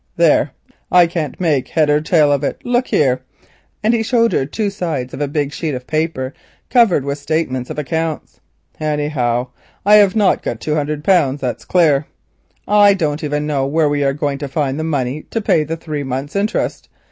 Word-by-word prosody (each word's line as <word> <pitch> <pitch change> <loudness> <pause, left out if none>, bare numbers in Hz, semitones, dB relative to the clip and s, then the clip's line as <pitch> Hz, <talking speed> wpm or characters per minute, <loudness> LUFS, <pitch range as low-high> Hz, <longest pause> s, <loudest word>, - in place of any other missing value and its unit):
There, - - +3 0.4
I 180 -1 +7
can't 165 -5 -4
make 155 -7 +1
head 155 -2 +1
or 150 +1 +3
tail 155 -2 +3
of 140 0 +1
it. - - -2
Look 245 +1 +1
here," 130 -3 +2 0.6
and 220 +2 +3
he 230 - +1
showed 230 0 +2
her 135 - +1
two 205 +5 -2
sides 155 -10 -3
of - - -6
a 145 - 0
big 145 0 -2
sheet 155 -4 -3
of 125 0 -7
paper 155 -4 -2 0.4
covered 225 - +4
with 140 +1 -3
statements 145 -4 -2
of - - -6
accounts. 160 +1 -3 0.4
"Anyhow, 145 -5 -1 0.4
I 210 +1 +7
have 200 -2 +4
not 210 -3 +3
got 110 - -4
two 150 - -2
hundred, 150 0 -2
that's 140 -9 +1
clear. 150 -5 +3 0.6
I 205 -1 +5
don't 155 -4 -2
even 150 0 -1
know 140 -3 0
where 155 +1 +2
we 145 0 0
are 135 0 +1
going 140 -1 -2
to 145 - -4
find 135 0 -2
the - - -2
money 145 -2 -2
to 225 - -2
pay 165 -7 +2
the 160 +2 -4
three 155 -3 -5
months' 135 +4 -4
interest. 205 +2 -1
150 Hz, 195 wpm, -18 LUFS, 140-170 Hz, 0.6 s, I